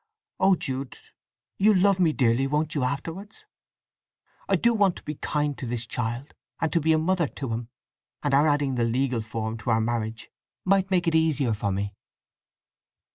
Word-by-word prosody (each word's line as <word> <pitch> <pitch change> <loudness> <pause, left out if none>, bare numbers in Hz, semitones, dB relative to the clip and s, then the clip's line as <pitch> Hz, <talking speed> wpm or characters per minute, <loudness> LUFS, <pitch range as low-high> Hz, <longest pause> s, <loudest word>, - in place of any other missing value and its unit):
Oh 190 0 +5
Jude, 135 -4 -4 0.6
you'll 205 0 +5
love 195 0 +4
me 170 -4 +4
dearly, 130 -1 +2
won't 150 +2 0
you, 145 - 0
afterwards? 165 +11 -4 1.0
I - - +4
do 235 0 +3
want 200 -5 +3
to - - -11
be 150 - -4
kind 150 0 -1
to 130 - -4
this 120 0 -3
child, 120 +3 -4 0.3
and 160 - -1
to 170 - +3
be 160 +2 +2
a - - +4
mother 170 0 +1
to 135 -3 -5
him; 115 +1 -4 0.5
and 145 -2 0
our 145 +3 +5
adding 145 -2 +1
the 120 -2 0
legal 125 +1 0
form 110 0 -4
to 120 - -4
our 110 -1 +3
marriage 115 0 -3 0.3
might 190 0 +3
make 180 -3 +1
it 165 - +2
easier 155 -7 +2
for 100 -1 -2
me." 100 +2 -2
140 Hz, 185 wpm, -26 LUFS, 120-165 Hz, 1.0 s, Oh